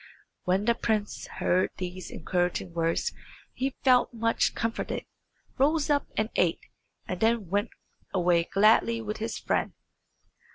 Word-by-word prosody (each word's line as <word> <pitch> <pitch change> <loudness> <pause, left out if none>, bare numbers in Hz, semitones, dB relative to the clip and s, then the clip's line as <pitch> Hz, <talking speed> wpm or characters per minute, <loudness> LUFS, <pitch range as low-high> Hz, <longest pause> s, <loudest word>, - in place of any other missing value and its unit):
When 190 +3 +1
the 235 - +4
prince 215 -3 -2
heard 185 +1 +1
these 185 0 -5
encouraging 175 +1 -1
words 165 - 0 0.4
he 265 +1 -2
felt 255 -2 +5
much 230 -1 +1
comforted, 230 0 -2 0.5
rose 300 +2 +3
up, 285 -1 +2
and 215 +1 0
ate, 175 -2 +2 0.5
and 185 - -3
then 225 -4 +1
went 205 +3 +1 0.4
away 175 -2 +3
gladly 220 +4 +4
with 215 -1 -4
his 225 +1 -3
friend. - - -1
215 Hz, 130 wpm, -28 LUFS, 180-230 Hz, 0.5 s, felt